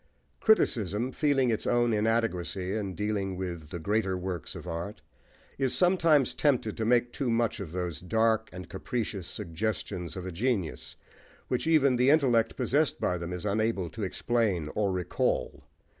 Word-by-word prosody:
Criticism, 120 Hz, -, +2 dB
feeling 135 Hz, -4 st, +2 dB
its 110 Hz, -, -2 dB
own 120 Hz, -1 st, +3 dB
inadequacy 105 Hz, -4 st, 0 dB
in 100 Hz, -4 st, -3 dB
dealing 100 Hz, -3 st, -2 dB
with 85 Hz, -5 st, -5 dB
the 90 Hz, -, -5 dB
greater 95 Hz, +2 st, 0 dB
works 90 Hz, -2 st, -5 dB
of -, -, -8 dB
art, 85 Hz, +5 st, -5 dB, 0.6 s
is 130 Hz, -2 st, +2 dB
sometimes 165 Hz, -7 st, +4 dB
tempted 125 Hz, -7 st, +1 dB
to 110 Hz, -, -2 dB
make 120 Hz, +1 st, +2 dB
too 135 Hz, -4 st, -1 dB
much 115 Hz, 0 st, +1 dB
of 95 Hz, -6 st, -6 dB
those 90 Hz, -3 st, -3 dB
dark 110 Hz, +3 st, +1 dB
and 90 Hz, -2 st, -8 dB
capricious 100 Hz, 0 st, -4 dB
suggestions 90 Hz, -2 st, -3 dB
of 95 Hz, -1 st, -5 dB
genius, 100 Hz, -, -2 dB, 0.5 s
which 125 Hz, +5 st, -1 dB
even 140 Hz, -6 st, +4 dB
the 125 Hz, +2 st, +4 dB
intellect 125 Hz, -7 st, +3 dB
possessed 145 Hz, +2 st, +1 dB
by 90 Hz, -, +1 dB
them 85 Hz, +1 st, -5 dB
is 90 Hz, +2 st, -5 dB
unable 105 Hz, -4 st, 0 dB
to 110 Hz, -, -7 dB
explain 100 Hz, -5 st, 0 dB
or 100 Hz, -2 st, +1 dB
recall. 90 Hz, -8 st, -1 dB
105 Hz, 155 wpm, -29 LUFS, 90-120 Hz, 0.6 s, sometimes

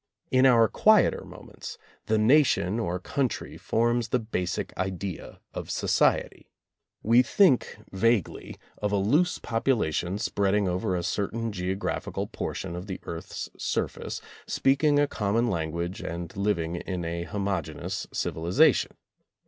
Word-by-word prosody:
In 130 Hz, +1 st, +5 dB
our 115 Hz, -3 st, +6 dB
quieter -, -, +4 dB
moments, -, -, -10 dB, 0.3 s
the 110 Hz, -, +2 dB
Nation 115 Hz, -, +3 dB
or 90 Hz, -5 st, -1 dB
Country 130 Hz, +7 st, -2 dB
forms 120 Hz, 0 st, 0 dB
the 125 Hz, -, +2 dB
basic 95 Hz, -6 st, -3 dB
idea 95 Hz, -1 st, -4 dB
of -, -, -6 dB
society. -, -, +1 dB, 0.5 s
We 115 Hz, +3 st, +6 dB
think 130 Hz, -, +3 dB
vaguely 110 Hz, 0 st, 0 dB, 0.2 s
of 105 Hz, -1 st, 0 dB
a -, -, +2 dB
loose 145 Hz, -, +2 dB
population 110 Hz, -, 0 dB
spreading 100 Hz, -2 st, +1 dB
over 90 Hz, +1 st, -1 dB
a 85 Hz, -, -2 dB
certain 110 Hz, +5 st, -2 dB
geographical 95 Hz, 0 st, -3 dB
portion 85 Hz, -, -5 dB
of 90 Hz, +3 st, -6 dB
the 95 Hz, -, -5 dB
earth's 85 Hz, 0 st, -6 dB
surface, -, -, -2 dB, 0.3 s
speaking 145 Hz, +2 st, +3 dB
a 145 Hz, -, +5 dB
com 105 Hz, -6 st, -2 dB
mon 120 Hz, 0 st, +2 dB
language, 85 Hz, +2 st, -3 dB
and 85 Hz, 0 st, -6 dB
living 90 Hz, -4 st, 0 dB
in 90 Hz, -1 st, -4 dB
a 85 Hz, +1 st, -3 dB
homogeneous 95 Hz, -1 st, -3 dB
civi -, -, -3 dB
lization. 85 Hz, +2 st, +4 dB
100 Hz, 130 wpm, -27 LUFS, 90-115 Hz, 0.5 s, our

